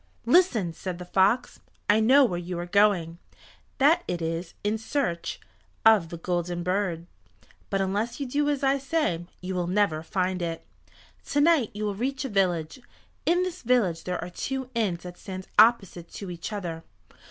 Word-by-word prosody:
"Listen!" 235 - +3
said 180 +1 -5
the 180 - -8
fox. 195 +7 +2 0.3
"I 210 +1 +5
know 260 +5 +6
where 175 -7 -2
you 175 0 -5
are 175 - -3
going, 175 -3 +2 0.6
that 320 +6 +4
it 175 - -2
is 165 +1 -4
in 210 +2 0
search 225 -7 -2 0.5
of 215 -7 +6
the 170 - -6
Golden 175 0 -2
Bird, 180 -2 -1 0.6
but 195 -1 0
unless 210 +6 -1
you 280 - -2
do 290 +3 0
as 285 -2 -1
I 275 +1 +3
say 270 - -1
you 185 +1 -4
will 180 -1 -1
never 185 -4 +1
find 185 +2 -1
it. 165 -1 -4 0.6
To 290 - 0
night 305 -7 +4
you 210 - -4
will 205 - -1
reach 265 +7 -2
a - - -3
village. 180 -2 0 0.5
In 355 +2 +3
this 365 0 -4
village 225 -9 +1
there 180 0 -2
are 180 - -7
two 265 +7 -4
inns 200 -7 -1
that 180 -1 -9
stand 185 -1 -7
opposite 200 -7 +4
to 195 -3 -6
each 170 +4 -6
other. 170 -6 -5
195 Hz, 175 wpm, -26 LUFS, 175-245 Hz, 0.6 s, know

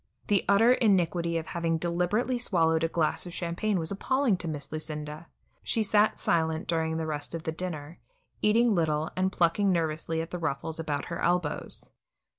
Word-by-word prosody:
The 200 -2 +3
utter 225 +5 +6
iniquity 175 -7 +2
of 160 - -3
having 165 -1 -1
deliberately 180 +9 0
swallowed 165 -8 +2
a - - +3
glass 165 +1 -1
of 175 - -7
champagne 185 +4 -1
was 165 0 -2
appalling 260 +3 +1
to 175 - -5
Miss 150 -3 -4
Lucinda. 155 0 -5 0.3
She 225 - 0
sat 210 +1 +3
silent 160 -1 0
during 160 -1 0
the 160 - -2
rest 150 +1 -3
of 165 - -5
the 160 - -2
dinner, 160 -2 -4 0.4
eating 230 +2 +4
little, 160 -3 0
and 185 +1 +1
plucking 190 +3 +2
nervously 160 -1 -1
at 165 +1 -4
the 180 - -4
ruffles 160 0 -3
about 150 -3 -2
her - - -4
elbows. 175 -3 -1
170 Hz, 175 wpm, -28 LUFS, 160-190 Hz, 0.4 s, utter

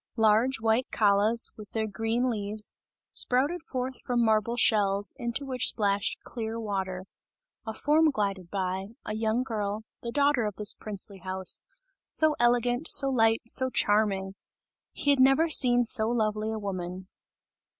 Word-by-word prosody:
Large, 225 +4 +3
white 225 +3 +1
callas, 210 +2 +2
with 210 -2 -12
their 220 -1 -1
green 225 +4 -1
leaves, 210 -1 -2 0.4
sprouted 285 +8 +2
forth 260 -5 -5
from 240 -1 0
marble 220 +2 +1
shells, 205 -3 +2
into 235 +4 -3
which 255 -2 0
splashed 200 -2 0
clear 225 -1 -5
water; 190 -4 -4 0.6
a 220 - -3
form 310 +5 +3
glided 195 - -3
by, 190 0 -3 0.2
a 215 - -4
young 220 +3 0
girl, 215 -3 -3 0.2
the 235 - -5
daughter 280 -3 +2
of 210 -2 -4
this 210 -1 +1
princely 200 -2 -6
house, 185 +1 -1 0.5
so 310 -1 +2
elegant, 245 +3 +1
so 275 -1 +5
light, 225 -3 +2
so 260 +2 +2
charming! 205 -4 +1 0.6
He 285 - 0
had 280 - +2
never 270 +5 +4
seen 245 -5 +5
so 220 -1 +2
lovely 215 -2 -1
a 220 - -3
woman. 185 -2 -5
220 Hz, 150 wpm, -27 LUFS, 205-245 Hz, 0.6 s, so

